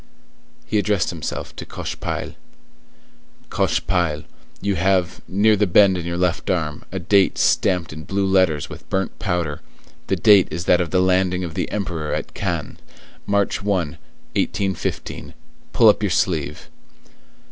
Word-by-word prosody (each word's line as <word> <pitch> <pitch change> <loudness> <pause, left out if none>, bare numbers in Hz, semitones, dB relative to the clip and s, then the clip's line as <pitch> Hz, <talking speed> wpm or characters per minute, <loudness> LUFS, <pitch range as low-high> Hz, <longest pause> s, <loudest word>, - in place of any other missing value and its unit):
He 105 - +1
addressed 100 -3 +1
himself 85 -3 -5
to - - -5
Cochepaille:— - - -5 1.2
"Cochepaille, 80 -5 0 0.4
you 100 0 0
have, 90 0 +1
near 105 +3 +3
the 105 0 +2
bend 95 +1 +5
in 85 -2 -4
your 85 0 -2
left 90 -1 0
arm, 80 -5 -1
a 95 - -4
date 95 +2 +3
stamped 90 -5 +1
in 80 0 -9
blue 100 0 0
letters 95 -6 +2
with - - -11
burnt 95 0 -2
powder; 85 -7 -2 0.5
the 95 - +1
date 100 +1 +6
is 85 +2 -4
that 90 - +4
of 85 - -2
the 90 -1 +2
landing 90 0 +2
of 85 -2 -5
the - - -2
Emperor 85 -7 -2
at - - -5
Cannes, - - -3 0.5
March 100 -1 +1
1, 95 -6 0
1815; 95 +4 -4 0.4
pull 115 - +5
up 105 - +5
your 105 - +1
sleeve!" 75 -5 -1
90 Hz, 145 wpm, -21 LUFS, 85-100 Hz, 1.2 s, date